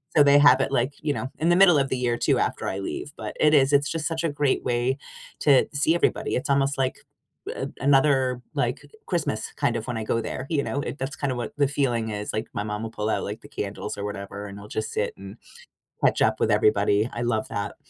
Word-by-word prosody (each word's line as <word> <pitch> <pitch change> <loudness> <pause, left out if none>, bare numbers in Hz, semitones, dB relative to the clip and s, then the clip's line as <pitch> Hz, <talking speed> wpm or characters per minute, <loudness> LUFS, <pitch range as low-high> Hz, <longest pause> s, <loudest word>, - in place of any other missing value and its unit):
So, 145 - +7
they 145 0 +6
have 135 -2 +7
it, 135 - -1
like, 130 +2 +1
you 150 -2 0
know, 130 - -4
in 165 +2 +2
the 175 - +5
middle 180 -4 +7
of 135 - 0
the 130 - -1
year 120 -1 0
too - - +2
after - - -1
I 95 - -3
leave, 140 +8 -5
but - - -6
it 150 0 +4
is 135 -1 +5
it's 145 0 +3
just 165 -2 -2
such 165 0 -2
a 165 - +1
great 145 -1 0
way 125 +3 0 0.4
to 140 -3 +4
see 150 +4 +2
everybody, 175 - 0
it's 130 - -2
almost 140 0 +2
like 130 -1 -1 0.6
a - - -4
another, 135 -2 +3
like, - - -1 0.2
Christmas 150 - -2
kind 120 - 0
of 115 - -6
when 120 - -3
I 110 - -3
go 115 - 0
there, 130 - -5
you 150 -4 +1
know? 140 - -2
It 140 +1 -5
that's 135 +2 -4
kind 140 -2 -2
of 125 - -3
what 120 - -4
the 140 - +4
feeling 120 -5 0
is. 105 0 -4
Like, 110 - -2
my 105 - -2
mom 105 +1 -4
will 110 - -5
pull 110 -1 -3
out - - 0
like 105 +2 -5
the - - -13
candles 105 +1 -5
or 100 - -5
whatever 100 0 -6
and 100 +1 -9
I'll 105 - -11
just 110 +1 -4
sit 105 - -1
and 100 +3 -10 0.7
catch - - +3
up - - +2
with - - +2
everybody. 105 +2 +3
I 120 - -4
love 115 -2 0
that. 100 0 -4
130 Hz, 250 wpm, -25 LUFS, 110-145 Hz, 0.7 s, So